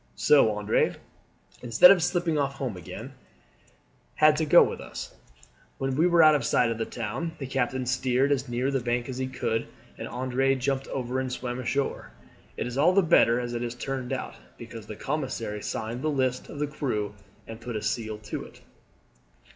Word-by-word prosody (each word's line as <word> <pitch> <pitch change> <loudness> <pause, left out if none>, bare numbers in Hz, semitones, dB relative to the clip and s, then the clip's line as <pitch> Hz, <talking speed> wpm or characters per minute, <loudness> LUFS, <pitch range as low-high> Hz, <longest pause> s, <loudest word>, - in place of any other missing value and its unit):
So 140 -6 +5
Andre, 105 +1 +1 0.7
instead 125 - +7
of 190 -3 +4
slipping 175 -1 0
off 140 -2 0
home 130 -6 -4
again, 90 -3 -9 1.0
had 155 0 +5
to 160 - 0
go - - +8
with - - -3
us. - - -8 0.6
When 135 -1 -2
we 160 +5 +4
were 170 -2 +5
out 155 0 +7
of 145 -4 +1
sight 115 0 +2
of 115 - -4
the 115 - -2
town 120 +9 -4
the 135 - -5
captain 130 -1 -1
steered 130 +2 +1
as 135 -2 0
near 125 +3 -1
the 135 - +1
bank 120 0 -1
as 130 0 -5
he 130 - -1
could 115 -3 -2 0.3
and - - -5
Andre 130 +2 0
jumped 135 +1 -1
over 130 0 -3
and 130 -1 -3
swam 125 0 -4
ashore. 135 +3 -2 0.4
It - - -2
is 125 +2 -4
all 175 +5 +5
the 195 0 +4
better 125 -8 +4
as 120 -1 -4
it 120 - -3
has 120 0 -4
turned 130 0 -4
out, - - -3 0.2
because 115 -2 -10
the 105 - -7
commissary 120 -8 -3
signed 115 +4 -4
the 155 - 0
list 130 -3 -1
of - - -8
the 150 - 0
crew 120 -9 -3 0.3
and 115 0 -9
put 120 -1 -6
a 105 - -2
seal 110 -2 -2
to 105 0 -6
it." - - -15
130 Hz, 195 wpm, -27 LUFS, 120-140 Hz, 1.0 s, go